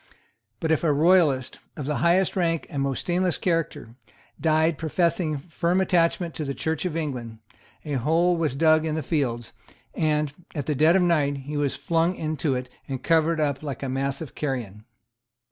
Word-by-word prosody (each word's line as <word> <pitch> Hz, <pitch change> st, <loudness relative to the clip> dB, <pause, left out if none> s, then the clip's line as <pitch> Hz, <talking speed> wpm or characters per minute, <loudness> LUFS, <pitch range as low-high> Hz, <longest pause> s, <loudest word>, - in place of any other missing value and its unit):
But 160 Hz, -, -1 dB
if 160 Hz, -, +2 dB
a 160 Hz, -, +3 dB
royalist, 150 Hz, -4 st, +3 dB, 0.2 s
of 145 Hz, -, -4 dB
the 150 Hz, 0 st, -1 dB
highest 180 Hz, +4 st, +2 dB
rank 165 Hz, -3 st, 0 dB
and 140 Hz, -3 st, -2 dB
most 135 Hz, -1 st, -1 dB
stainless 180 Hz, -1 st, 0 dB
character, 165 Hz, -9 st, -2 dB, 0.5 s
died 160 Hz, 0 st, +2 dB
professing 165 Hz, -1 st, 0 dB
firm 170 Hz, +4 st, -1 dB
attachment 175 Hz, -2 st, +1 dB
to 155 Hz, -, -4 dB
the 140 Hz, -1 st, -3 dB
Church 160 Hz, +2 st, -2 dB
of 165 Hz, -3 st, -2 dB
England, 125 Hz, -8 st, -4 dB, 0.5 s
a 150 Hz, -, -3 dB
hole 170 Hz, +6 st, +3 dB
was 160 Hz, -6 st, -1 dB
dug 155 Hz, +1 st, +4 dB
in 155 Hz, -1 st, -1 dB
the 155 Hz, -, -2 dB
fields; 125 Hz, -7 st, -2 dB, 0.4 s
and, 150 Hz, -2 st, 0 dB, 0.2 s
at 145 Hz, -4 st, -3 dB
dead 155 Hz, +3 st, +3 dB
of 190 Hz, -, +4 dB
night, 150 Hz, -5 st, +2 dB
he 150 Hz, +1 st, -5 dB
was 145 Hz, -2 st, 0 dB
flung 170 Hz, +2 st, 0 dB
into 155 Hz, -4 st, -1 dB
it 125 Hz, 0 st, -4 dB, 0.2 s
and 135 Hz, -2 st, -5 dB
covered 165 Hz, 0 st, +2 dB
up 145 Hz, -3 st, 0 dB
like 145 Hz, -2 st, -5 dB
a 135 Hz, -, -2 dB
mass 135 Hz, +2 st, -2 dB
of 160 Hz, -, -7 dB
carrion. 115 Hz, -8 st, -4 dB
155 Hz, 180 wpm, -25 LUFS, 140-165 Hz, 0.5 s, dug